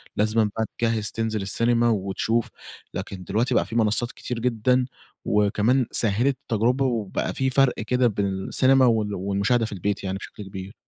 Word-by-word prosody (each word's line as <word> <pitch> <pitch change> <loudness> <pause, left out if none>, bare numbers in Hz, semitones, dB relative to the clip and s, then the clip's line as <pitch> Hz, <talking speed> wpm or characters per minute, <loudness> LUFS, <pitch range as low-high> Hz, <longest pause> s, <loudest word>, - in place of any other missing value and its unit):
لازمًا 110 0 +2
بقى 110 - 0
تجّهز 115 -3 0
تنزل 110 -2 -2
السينما 115 +4 +2
وتشوف، 110 +2 0 0.4
لكن 95 0 -6
دلوقتي 110 +7 0
بقى - - +3
في 115 - -8
منصات 115 +1 +1
كتير 125 -2 -5
جدًا، 125 +2 +1 0.4
وكمان 105 +5 +2
سهلت 120 +5 +2
التجْرُبة 125 +3 +1
وبقى 115 -6 -2
في 130 0 0
فَرْق 135 0 +3
كده 125 +3 +1
بين 100 -3 -1
السينما 130 +7 +3
وال 110 -3 +1
والمشاهدة 100 +5 0
في - - -6
البيت 100 +1 -2
يعني 95 0 -2
بشكل 105 - -9
كبير. 95 +2 -8
110 Hz, 160 wpm, -24 LUFS, 100-120 Hz, 0.4 s, بقى